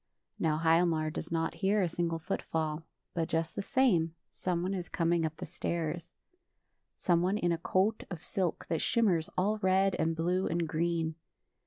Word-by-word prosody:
Now 155 Hz, -1 st, +2 dB
Hialmar 165 Hz, -1 st, +3 dB
does -, -, -5 dB
not 165 Hz, -1 st, 0 dB
hear 200 Hz, +1 st, +3 dB
a -, -, +2 dB
single 170 Hz, 0 st, -1 dB
foot 165 Hz, -, -3 dB
fall, 155 Hz, -1 st, -2 dB, 0.3 s
but 165 Hz, -2 st, -1 dB
just 165 Hz, 0 st, -1 dB
the -, -, -1 dB
same, 195 Hz, -, +2 dB, 0.2 s
someone 180 Hz, +1 st, -1 dB
is 180 Hz, -2 st, -4 dB
coming 170 Hz, -1 st, +1 dB
up 155 Hz, 0 st, -9 dB
the -, -, -5 dB
stairs 170 Hz, 0 st, -3 dB, 0.5 s
— -, -, -51 dB
someone 180 Hz, +3 st, +3 dB
in 175 Hz, -4 st, +1 dB
a 165 Hz, -, 0 dB
coat 190 Hz, +5 st, +1 dB
of 175 Hz, -4 st, -7 dB
silk 185 Hz, -4 st, -2 dB
that 165 Hz, -, 0 dB
shimmers 185 Hz, -9 st, +2 dB
all 210 Hz, +4 st, +2 dB
red 190 Hz, 0 st, +3 dB
and 160 Hz, +1 st, +1 dB
blue 180 Hz, +3 st, +1 dB
and 170 Hz, 0 st, 0 dB
green. 165 Hz, 0 st, 0 dB
170 Hz, 175 wpm, -31 LUFS, 165-185 Hz, 0.5 s, Hialmar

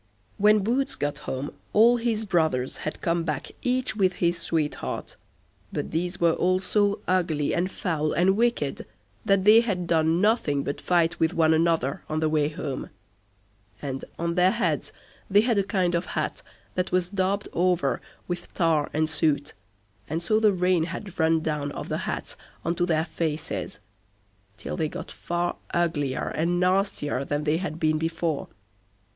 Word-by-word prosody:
When 210 Hz, 0 st, +5 dB
Boots 260 Hz, +6 st, 0 dB
got 145 Hz, 0 st, -2 dB
home 135 Hz, +3 st, -3 dB, 0.2 s
all 235 Hz, +3 st, +6 dB
his 230 Hz, -2 st, -1 dB
brothers 160 Hz, -9 st, +1 dB
had 155 Hz, -, -5 dB
come 170 Hz, 0 st, +1 dB
back 150 Hz, -4 st, -3 dB
each 255 Hz, -1 st, 0 dB
with 190 Hz, -3 st, +2 dB
his 170 Hz, -1 st, 0 dB
sweetheart, 155 Hz, -3 st, -2 dB, 0.6 s
but -, -, -3 dB
these 175 Hz, +2 st, -2 dB
were 170 Hz, -1 st, +4 dB
all 185 Hz, +2 st, +2 dB
so 205 Hz, +2 st, +1 dB
ugly, 170 Hz, -5 st, +1 dB
and 180 Hz, +2 st, 0 dB
foul, 155 Hz, -6 st, -1 dB
and 185 Hz, +5 st, +3 dB
wicked, 225 Hz, -, 0 dB, 0.4 s
that 195 Hz, -2 st, +3 dB
they 220 Hz, +2 st, +8 dB
had 195 Hz, -7 st, -2 dB
done 165 Hz, 0 st, +2 dB
nothing 185 Hz, -, +2 dB
but 145 Hz, +1 st, -4 dB
fight 170 Hz, +1 st, +2 dB
with 160 Hz, +2 st, +1 dB
one 160 Hz, -1 st, +4 dB
another 160 Hz, -4 st, +1 dB
on 155 Hz, 0 st, -1 dB
the 155 Hz, 0 st, +1 dB
way 150 Hz, -1 st, +2 dB
home, 150 Hz, -4 st, -5 dB, 0.9 s
and 135 Hz, -2 st, -4 dB
on 170 Hz, 0 st, -1 dB
their 180 Hz, +1 st, +4 dB
heads -, -, -1 dB, 0.4 s
they 205 Hz, +1 st, +6 dB
had 230 Hz, -2 st, +2 dB
a -, -, +2 dB
kind 185 Hz, -3 st, 0 dB
of 170 Hz, +1 st, 0 dB
hat -, -, -2 dB, 0.3 s
that 180 Hz, 0 st, -1 dB
was 180 Hz, -1 st, +2 dB
daubed 200 Hz, +1 st, 0 dB
over 180 Hz, 0 st, +1 dB, 0.3 s
with 175 Hz, 0 st, -5 dB
tar 165 Hz, -4 st, +2 dB
and 155 Hz, +1 st, +2 dB
soot, 155 Hz, -2 st, 0 dB, 0.6 s
and 160 Hz, +3 st, -2 dB
so 215 Hz, +5 st, +3 dB
the 215 Hz, -1 st, +5 dB
rain 180 Hz, -3 st, +2 dB
had 180 Hz, +2 st, -7 dB
run 160 Hz, 0 st, +3 dB
down 150 Hz, -2 st, -2 dB
off -, -, -6 dB
the -, -, -1 dB
hats -, -, -4 dB, 0.3 s
on 170 Hz, -, +1 dB
to 175 Hz, 0 st, 0 dB
their 160 Hz, -2 st, +1 dB
faces, 155 Hz, -3 st, -3 dB, 0.8 s
till 105 Hz, -, -5 dB
they 155 Hz, -1 st, -1 dB
got -, -, -7 dB
far 175 Hz, 0 st, -2 dB, 0.2 s
uglier 155 Hz, -6 st, 0 dB
and 170 Hz, +3 st, 0 dB
nastier 180 Hz, -7 st, +1 dB
than 145 Hz, +2 st, -2 dB
they 150 Hz, +1 st, +2 dB
had 165 Hz, -3 st, -4 dB
been 155 Hz, -1 st, +2 dB
before. 165 Hz, -1 st, -1 dB
170 Hz, 170 wpm, -26 LUFS, 155-190 Hz, 0.9 s, they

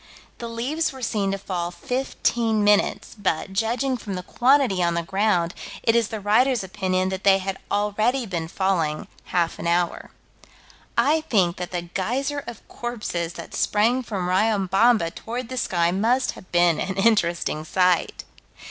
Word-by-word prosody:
The 235 Hz, -, -5 dB
leaves 260 Hz, +8 st, -1 dB
were 265 Hz, -2 st, -10 dB
seen 200 Hz, -4 st, 0 dB
to 195 Hz, -, -1 dB
fall 180 Hz, -3 st, -3 dB
fifteen 235 Hz, 0 st, -1 dB
minutes, 205 Hz, 0 st, +2 dB
but, 190 Hz, -1 st, -1 dB
judging 245 Hz, +6 st, 0 dB
from 205 Hz, -4 st, -6 dB
the 180 Hz, -, -5 dB
quantity 250 Hz, -4 st, +3 dB
on 170 Hz, -1 st, +1 dB
the 170 Hz, -, -1 dB
ground, 180 Hz, -2 st, +1 dB, 0.3 s
it 225 Hz, -, +3 dB
is 230 Hz, -2 st, +3 dB
the 220 Hz, -, -5 dB
writer's 225 Hz, +4 st, +2 dB
opinion 185 Hz, -1 st, -1 dB
that 190 Hz, 0 st, -4 dB
they 195 Hz, -1 st, +6 dB
had 195 Hz, 0 st, -4 dB
already 215 Hz, +5 st, +1 dB
been 170 Hz, -5 st, -3 dB
falling 165 Hz, -4 st, -1 dB, 0.2 s
half 170 Hz, -2 st, -1 dB
an -, -, -3 dB
hour. 170 Hz, 0 st, 0 dB, 0.9 s
I 310 Hz, +3 st, +3 dB
think 180 Hz, -6 st, +2 dB
that 180 Hz, -1 st, -5 dB
the 175 Hz, -2 st, -3 dB
geyser 260 Hz, +11 st, -2 dB
of 235 Hz, -, -9 dB
corpses 210 Hz, -8 st, -4 dB
that -, -, -9 dB
sprang 230 Hz, +5 st, +2 dB
from 200 Hz, -7 st, -3 dB
Riobamba 195 Hz, 0 st, +3 dB
toward 240 Hz, +1 st, -6 dB
the 260 Hz, -, -5 dB
sky 175 Hz, -7 st, +1 dB
must 235 Hz, +7 st, +1 dB
have 185 Hz, -, -15 dB
been 175 Hz, -2 st, +3 dB
an 190 Hz, -, -2 dB
interesting 175 Hz, -7 st, +1 dB
sight. 180 Hz, +1 st, +1 dB
200 Hz, 160 wpm, -23 LUFS, 180-235 Hz, 0.9 s, they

